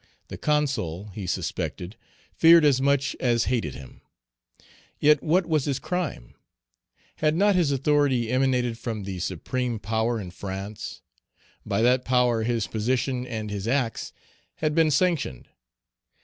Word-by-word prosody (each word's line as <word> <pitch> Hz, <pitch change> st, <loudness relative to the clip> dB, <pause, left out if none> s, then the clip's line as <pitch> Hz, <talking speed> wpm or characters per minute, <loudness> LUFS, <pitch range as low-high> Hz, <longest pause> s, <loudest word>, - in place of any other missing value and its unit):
The -, -, -7 dB
Consul, 120 Hz, -, -1 dB
he 100 Hz, -2 st, -6 dB
suspected, 90 Hz, +3 st, -3 dB, 0.4 s
feared 165 Hz, -1 st, +7 dB
as 135 Hz, -3 st, +4 dB
much 140 Hz, 0 st, +1 dB
as 120 Hz, -2 st, +2 dB
hated 115 Hz, -, -1 dB
him. 65 Hz, -3 st, -12 dB, 1.0 s
Yet 150 Hz, +1 st, +4 dB
what 175 Hz, +3 st, +2 dB
was 155 Hz, -4 st, 0 dB
his 140 Hz, -3 st, -1 dB
crime? 160 Hz, -, -4 dB, 0.8 s
Had 155 Hz, 0 st, +1 dB
not 205 Hz, +3 st, +4 dB
his 175 Hz, -6 st, +2 dB
authority 135 Hz, -4 st, +1 dB
emanated 125 Hz, -3 st, +1 dB
from 115 Hz, -3 st, -4 dB
the 95 Hz, -2 st, -5 dB
supreme 120 Hz, +8 st, -2 dB
power 110 Hz, +3 st, -1 dB
in 90 Hz, -4 st, -7 dB
France? 95 Hz, +3 st, -7 dB, 0.6 s
By 100 Hz, +3 st, +1 dB
that 125 Hz, +1 st, +3 dB
power 125 Hz, -3 st, +2 dB
his 115 Hz, -1 st, 0 dB
position 125 Hz, +3 st, -1 dB
and 110 Hz, -3 st, -5 dB
his 100 Hz, 0 st, -4 dB
acts 125 Hz, -2 st, -1 dB, 0.4 s
had 155 Hz, -1 st, -1 dB
been 160 Hz, 0 st, +4 dB
sanctioned. 155 Hz, -, 0 dB
125 Hz, 135 wpm, -25 LUFS, 110-145 Hz, 1.0 s, feared